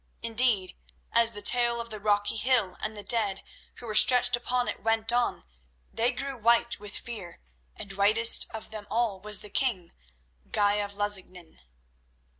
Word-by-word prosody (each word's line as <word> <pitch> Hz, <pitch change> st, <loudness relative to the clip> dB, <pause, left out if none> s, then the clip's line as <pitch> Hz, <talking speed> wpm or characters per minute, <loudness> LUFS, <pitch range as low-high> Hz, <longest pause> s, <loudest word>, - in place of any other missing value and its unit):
Indeed, 225 Hz, -5 st, +1 dB, 0.4 s
as 230 Hz, 0 st, +3 dB
the 205 Hz, -, -8 dB
tale 240 Hz, +1 st, +2 dB
of 235 Hz, -1 st, -7 dB
the 215 Hz, -, -5 dB
rocky 205 Hz, 0 st, 0 dB
hill 225 Hz, -5 st, +2 dB
and 215 Hz, 0 st, -4 dB
the 205 Hz, -, -7 dB
dead 205 Hz, -5 st, 0 dB, 0.3 s
who -, -, -12 dB
were 220 Hz, -, -5 dB
stretched 245 Hz, +3 st, +5 dB
upon 245 Hz, +1 st, -2 dB
it -, -, -5 dB
went 225 Hz, 0 st, +1 dB
on, 245 Hz, -, -1 dB, 0.5 s
they 235 Hz, +2 st, 0 dB
grew 275 Hz, +2 st, -5 dB
white 235 Hz, 0 st, +1 dB
with 205 Hz, 0 st, -2 dB
fear, 200 Hz, -8 st, -8 dB, 0.4 s
and 195 Hz, -, -8 dB
whitest 215 Hz, +4 st, +4 dB
of 220 Hz, -, -8 dB
them 215 Hz, -2 st, -7 dB
all 225 Hz, -4 st, -1 dB
was 210 Hz, +1 st, 0 dB
the 210 Hz, -, -6 dB
king, 195 Hz, -11 st, -1 dB, 0.6 s
Guy 205 Hz, 0 st, +1 dB
of 205 Hz, -1 st, -4 dB
Lusignan. 190 Hz, -4 st, -3 dB
220 Hz, 165 wpm, -27 LUFS, 205-235 Hz, 0.6 s, stretched